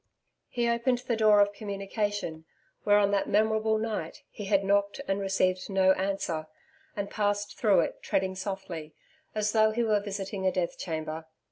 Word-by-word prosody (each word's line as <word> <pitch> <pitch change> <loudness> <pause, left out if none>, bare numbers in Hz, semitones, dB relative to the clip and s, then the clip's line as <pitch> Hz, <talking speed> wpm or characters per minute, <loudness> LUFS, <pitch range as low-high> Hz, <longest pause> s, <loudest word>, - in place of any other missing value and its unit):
He 240 -1 0
opened 235 +2 +2
the 235 - 0
door 215 -2 +5
of 205 0 +2
communication 200 -4 -3 0.4
where 205 0 +6
on 200 -1 +3
that 200 -1 0
memorable 220 +1 +2
night, 215 -7 -4
he 205 - -7
had 195 0 +2
knocked 200 +2 +1
and 195 +1 0
received 185 -1 0
no 190 -1 +4
answer 190 -5 -1 0.5
and 200 -2 -2
passed 205 -1 -1
through 205 -6 +5
it - - -4
treading 190 0 0
softly 190 -5 -6 0.4
as 210 0 +1
though 220 0 +4
he 230 +2 0
were 215 -2 +3
visiting 200 -1 -5
a - - +3
death 180 -2 -1
chamber. 160 -1 -4
200 Hz, 165 wpm, -28 LUFS, 190-215 Hz, 0.5 s, where